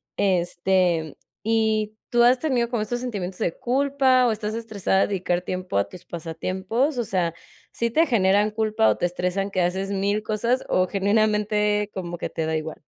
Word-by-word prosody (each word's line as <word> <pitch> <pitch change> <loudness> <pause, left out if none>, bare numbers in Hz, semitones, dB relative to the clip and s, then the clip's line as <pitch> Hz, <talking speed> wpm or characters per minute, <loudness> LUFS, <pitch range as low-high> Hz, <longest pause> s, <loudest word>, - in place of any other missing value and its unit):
Este, 175 -3 +1 0.2
¿y 220 0 +1 0.2
tú 240 - +4
has 245 +2 +6
tenido 250 -5 0
como 235 -3 -1
estos 240 +3 -3
sentimientos 200 -7 -4
de 165 - -1
culpa 260 0 +2
o - - +2
estás 215 0 -3
estresada 215 -4 0
de - - +2
dedicar 180 -3 -1
tiempo 185 - -5
a 100 - -1
tus 180 -1 -12
pasatiempos? 190 - -2
O - - +1
sea, 180 -5 -1 0.4
¿sí 235 - -1
te 320 +8 +3
generan 205 - +3
culpa 215 - +2
o 105 - +2
te 175 - +1
estresan 180 +3 -2
que 185 -2 0
haces 190 +3 -1
1000 200 +1 0
cosas 230 +4 0
o 185 - +3
generalmente 210 +1 +1
como 175 -2 -5
que - - -3
te 160 - -3
da 160 0 -1
igual? 155 0 -5
205 Hz, 180 wpm, -24 LUFS, 180-225 Hz, 0.4 s, has